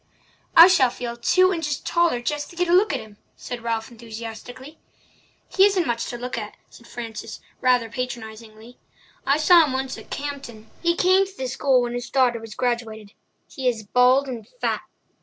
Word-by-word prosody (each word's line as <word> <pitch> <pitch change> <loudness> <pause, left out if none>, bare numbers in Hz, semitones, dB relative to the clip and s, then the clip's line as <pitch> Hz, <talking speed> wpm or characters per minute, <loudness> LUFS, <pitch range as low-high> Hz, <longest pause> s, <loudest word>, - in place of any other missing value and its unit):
"I 330 - +11
shall 345 -9 +4
feel 240 0 -6
two 370 +10 +3
inches 295 -5 -2
taller 340 -8 +1
just 295 +4 -3
to - - -14
get 355 +1 0
a 340 - +2
look 390 +4 +4
at - - -2
him," 215 -2 -13 0.2
said 245 -1 -7
Ralph 230 0 -3
enthusiastically. 235 +5 -10 0.7
"He 380 - +3
isn't 390 -4 +3
much 235 -3 -2
to 240 - -5
look 245 0 -4
at," 210 -1 -8
said 235 - -16
Frances, 230 -3 -7 0.2
rather 250 -2 +3
patronizingly. 225 -1 -8 0.5
"I 280 +2 +4
saw 335 +2 +6
him 285 -4 -2
once 265 0 -3
at - - -15
Campden—he 280 +2 -4
came 375 +2 +3
to 385 0 -16
the 260 - -3
school 260 0 +2
when 240 0 -3
his 245 0 -5
daughter 250 -3 +2
was 225 -1 -10
graduated. 225 -4 -3 0.3
He 260 -1 -4
is 220 -3 -5
bald 250 +5 +3
and 235 -5 -7
fat. - - -1
250 Hz, 180 wpm, -23 LUFS, 230-295 Hz, 0.7 s, I